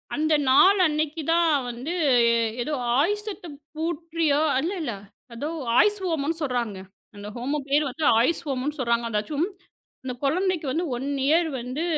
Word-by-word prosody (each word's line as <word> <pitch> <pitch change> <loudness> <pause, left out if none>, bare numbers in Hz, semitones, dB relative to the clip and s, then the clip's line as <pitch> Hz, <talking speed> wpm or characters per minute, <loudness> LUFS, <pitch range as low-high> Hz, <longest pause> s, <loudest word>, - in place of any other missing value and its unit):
அந்த 310 +1 +1 0.2
நாள் 380 +9 +6
அன்னைக்கி 310 +1 -2
தான் 340 0 +3 0.2
வந்து, 255 +8 -5 0.7
ஏதோ 305 - -3 0.2
ஆயுஷ் 415 +9 +1 0.5
பூட்ட்ரியோ, 325 -2 0 0.2
இல்ல 345 +7 -2
இல்ல. 245 -7 -3 0.4
ஏதோ 285 +6 -4 0.3
ஆயுஷ் 415 0 +4
ஹோமம்ன்னு 325 -1 -1
சொல்றாங்க. 240 -7 -2 0.4
அந்த 205 0 -9
ஹோமம் 275 +3 -3
பேரு 290 +1 +3 0.3
ஆயுஷ் 260 +8 +1
ஹோமம்ன்னு 275 +3 -2
சொல்றாங்க.அதாச்சும், 235 +5 0 0.6
அந்தச் 250 -1 -6
கொழந்தைக்கு 360 +2 0
வந்து 340 +5 -1
1 270 +3 -4 0.2
இயர் 325 +2 +3
வந்து 255 +6 -4
300 Hz, 130 wpm, -25 LUFS, 255-330 Hz, 0.7 s, நாள்